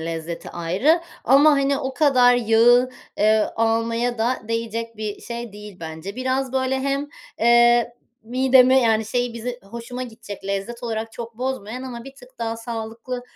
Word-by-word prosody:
lezzeti 165 +1 -5
ayrı 190 - +1 0.2
ama, 280 +5 +6
hani, 275 -1 +2
o 265 0 -4
kadar 255 -5 +5
yağı, 240 +2 +4 0.3
eee, 215 +1 +3
almaya 230 +1 0
da 240 +3 +1
değecek 230 0 -3
bir 215 -1 -5
şey 235 -2 -6
değil 210 -1 -11
bence. 160 +6 -7
Biraz 260 0 -1
böyle 265 0 0
hem, 275 +1 -1 0.3
eee, 240 0 +4 0.3
midemi, 255 +2 +4
yani, 220 -2 +2
şey, 245 +2 -1
bizi 245 +1 -5
hoşuma 235 +5 -7
gidecek 220 -5 -9
lezzet 200 +5 -4
olarak 225 -1 -4
çok 230 0 -8
bozmayan 255 -2 -4
ama 240 -3 -7
bir 270 - -11
tık 255 -1 -18
daha 230 -1 -2
sağlıklı 230 +2 -6
235 Hz, 155 wpm, -22 LUFS, 220-255 Hz, 0.3 s, ama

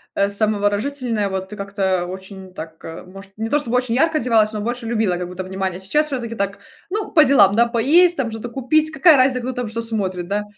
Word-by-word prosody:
э, 200 0 +1
самовыражающаяся 210 +2 -1
вот 190 0 -4
ты 210 - -8
как-то 195 -3 -1
очень 190 +1 -10
так, 160 -2 -10
э, 165 0 -8
может, 195 +1 -12
не 225 +1 -3
то 295 - +3
чтобы 250 -4 -1
очень 250 -2 -1
ярко 320 +4 +2
одевалась, 225 -3 +2
но 210 - -4
больше 240 +2 -4
любила, 220 -5 0
как 180 0 -4
будто 180 +1 -6
внимание. 190 -1 -4
Сейчас 300 +11 +1
все-таки 240 -5 -4
так, 200 -1 -2 0.3
ну, 420 +1 -3
по 310 - +6
делам, 205 -8 +5
да, 235 +1 +4
поесть 305 +10 +4
там, 260 -4 -1
что-то 225 +2 -7
купить, 300 +5 +1
какая 310 0 +5
разница, 255 0 +3
кто 250 +2 -3
там, 245 -2 -4
что 225 +2 -4
смотрит, 190 -6 -3
да? 205 +2 -1
220 Hz, 220 wpm, -20 LUFS, 195-255 Hz, 0.3 s, по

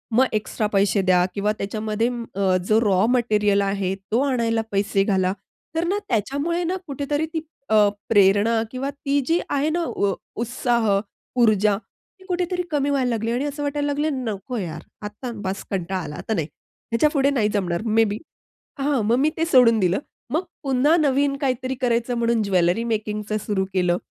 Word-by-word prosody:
मग 260 - +6
एक्स्ट्रा 215 0 -1
पैसे 200 0 +3
द्या 180 -1 +3
किंवा 205 +1 0
त्याच्यामध्ये 215 +2 -1 0.3
अ, 190 -2 +2
जो 215 +1 +4
रॉ 200 -2 +3
मटेरिअल 210 -5 +2
आहे, 195 -1 -1 0.2
तो 230 - +3
आणायला 230 -4 +1
पैसे 195 0 +1
घाला. 190 -2 +1 0.4
तर 325 - +1
ना, 395 - +1
त्याच्यामुळे 285 - -1
ना 350 +2 -1
कुठेतरी 290 +2 -1
ती 320 - -1 0.3
अ, 215 -1 +5 0.2
प्रेरणा 205 +2 +4
किंवा 265 +2 -3
ती 285 0 -1
जी 335 +4 +2
आहे 285 +2 +1
ना, 340 +2 0
उ 200 -9 0 0.3
उत्साह, 235 -2 0 0.5
ऊर्जा 210 -3 +4
ती 375 - -21
कुठेतरी 360 0 -1
कमी 285 -1 +1
व्हायला 265 -3 +1
लागली 230 0 -1
आणि 255 +4 -1
असं 290 0 -4
वाटायला 290 0 -1
लागल, 290 +1 0
"नको 240 -2 -4
यार, 165 -6 -4 0.2
आता 210 +4 -6
बास 190 +1 -3
कंटाळा 185 0 -2
आला, 150 - -7
आता 220 - -3
नाही, 160 -7 -1 0.4
ह्याच्यापुढे 280 +3 +3
नाही 230 -7 +1
जमणार 180 -3 -1
मे 225 0 +4
बी." 210 - -2 0.6
हां, 275 -1 +1
मग 230 - +3
मी 300 +3 +3
ते 325 - +1
सोडून 245 -6 +5
दिलं. 180 0 +2 0.4
मग 335 - +2 0.2
पुन्हा 275 +4 +3
नवीन 280 -2 +2
काहीतरी 255 -1 -1
करायचं 240 0 +1
म्हणून 230 -1 +2
ज्वेलरी 185 +2 +2
मेकिंगचं 215 -1 -2
सुरु 190 -2 0
केलं. 180 -1 +2
230 Hz, 170 wpm, -23 LUFS, 200-275 Hz, 0.6 s, मग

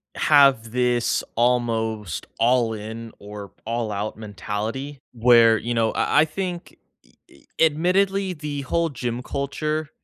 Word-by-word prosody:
have 135 -7 +4
this 125 -1 +1
almost, 115 -5 0
"all-in 115 -1 0
or 105 -1 -9
all-out 110 -3 -3
mentality," 110 +6 -5
where, 115 -1 +5
you 120 +2 -3
know 115 -1 +1
I 150 - +2
I - - +4
think 175 +2 -5 0.3
e - - -27 0.2
e - - -21 0.2
admittedly 185 +5 +2
the 150 -3 -5
whole 165 +5 0
gym 120 -3 -4
culture 150 +3 -3
120 Hz, 120 wpm, -23 LUFS, 110-150 Hz, 0.3 s, where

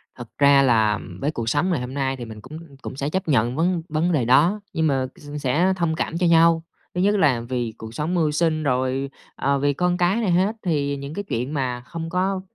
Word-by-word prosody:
Thật 120 -2 -9
ra 140 -1 +6
là, 110 -5 +3
ừm, 95 -3 -8
với 145 - -1
cuộc 115 -6 -3
sống 145 +8 +1
ngày 170 -6 +1
hôm 125 +1 -6
nay 135 -1 -1
thì 120 - -6
mình 110 -2 -10
cũng 130 +7 -10 0.2
cũng - - -7
sẽ 140 +1 -2
chấp 190 +3 -2
nhận 125 -4 +2
vấn 170 +2 +1
vấn 160 +3 0
đề 145 -8 +1
đó, 160 - +4
nhưng 160 -1 +1
mà 135 -2 +1
s 145 - -13
sẽ 155 +8 +2
thông 170 -3 0
cảm 165 - -2
cho 180 - +1
nhau. 165 0 +5 0.3
Thứ 180 - 0
nhất 205 +2 +3
là 140 - +3
vì 120 -3 -2
cuộc 110 0 -9
sống 150 +8 -2
mưu 160 -4 +2
sinh, 155 0 0
rồi, 130 0 0 0.3
à, 140 +1 +1
vì 145 +1 +1
con 180 +4 0
cái 180 +2 +2
này 205 -5 +1
hết, 190 +5 +2
thì 145 -5 0
những 140 +1 -7
cái 205 - -4
chuyện 130 -6 -3
mà 125 -4 -2
không 165 +6 -6
có, 185 +2 0
145 Hz, 245 wpm, -23 LUFS, 130-170 Hz, 0.3 s, ra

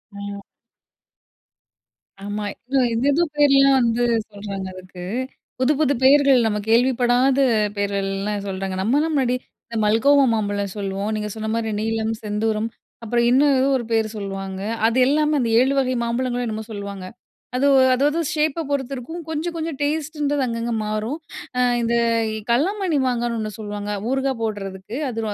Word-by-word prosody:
ஆ. 200 0 -6 1.8
ஆமா. 205 0 -3 0.2
இல்ல 270 +1 0 0.2
எதேதோ 285 +8 +2
பேர்லா 275 -1 +5
வந்து 235 0 +1 0.3
சொல்றாங்க. 200 -1 -6
அதுக்கு, 185 -1 -10 0.6
புது 260 +4 +3
புது 285 -2 +3
பேர்கள் 275 -1 +6
நம்ம 210 -1 0
கேள்விப்படாத 250 +2 +3 0.4
பேரேல்லா 200 0 -1
சொல்றாங்க. 190 0 -3
நம்மலா 290 +9 +2
முன்னாடி 255 -3 +2 0.3
இந்த 230 - -8
மல்கோவா 275 +7 +4
மாம்பழம் 205 -2 -1
சொல்லுவோம். 200 +1 -3
நீங்க 210 0 -3
சொன்ன 220 0 -4
மாரி 225 -1 -1
நீலம், 225 0 -1
செந்தூரம் 215 +1 -1 0.3
அப்புறம் 235 +1 +1
இன்னும் 275 +3 +4
ஏதோ 265 - +3
ஒரு 240 - -5
பேர் 220 -1 +2
சொல்லுவாங்க. 195 -1 -5 0.2
அது 230 +3 +2
எல்லாமே, 300 +2 +2
அந்த 230 - 0
7 265 +2 +3
வகை 255 -1 +1
மாம்பழங்களும் 245 +1 -1
என்னமோ 220 0 -4
சொல்லுவாங்க. 200 -2 -6 0.5
அது 275 +3 +2 0.3
அதாது 290 +5 +2 0.2
ஷேப்ப 310 +1 0
பொறுத்திருக்கும் 275 +4 -3
கொஞ்சம் 325 +2 -3
கொஞ்சம் 320 -3 -4
டேஸ்ட்டுன்றது 290 -1 -1
அங்கங்க 230 0 -2
மாறும். 215 +7 -2 0.4
ஆ - - +3 0.2
இந்த 235 0 +1 0.6
கல்லாமண்ணி 345 - +1
மாங்கான்னு 240 -1 -1
ஒண்ணு 215 -1 -3
சொல்லுவாங்க. 205 -1 -5 0.2
ஊறுகாய் 270 -2 0
போட்றதுக்கு, 200 +1 -5
அது 225 -2 -4
235 Hz, 135 wpm, -22 LUFS, 210-275 Hz, 1.8 s, பேர்கள்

